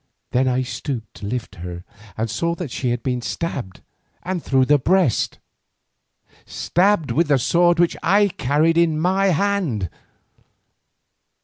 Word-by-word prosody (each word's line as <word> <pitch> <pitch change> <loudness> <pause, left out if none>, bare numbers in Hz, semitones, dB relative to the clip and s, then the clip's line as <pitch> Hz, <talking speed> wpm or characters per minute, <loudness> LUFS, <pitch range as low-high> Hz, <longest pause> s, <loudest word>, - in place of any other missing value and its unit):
Then 130 +1 +2
I 130 0 +1
stooped 120 -3 -5
to 100 - -7
lift 110 -3 -5
her 90 0 -7 0.3
and 110 +1 -1
saw 170 +10 -1
that 170 -7 -6
she 125 - -2
had 120 0 -2
been 125 -3 -1
stabbed, 120 - -4 0.4
and 185 -1 -3
through 130 -3 +2
the 145 +2 +4
breast, 175 - +1 1.1
stabbed 185 -3 +1
with 170 +1 +2
the 145 -2 +4
sword 175 +7 +3
which 175 -1 +3
I 205 +1 +3
carried 165 -1 +1
in 160 -2 +2
my 190 +4 +2
hand. 175 - 0
150 Hz, 140 wpm, -21 LUFS, 125-175 Hz, 1.1 s, the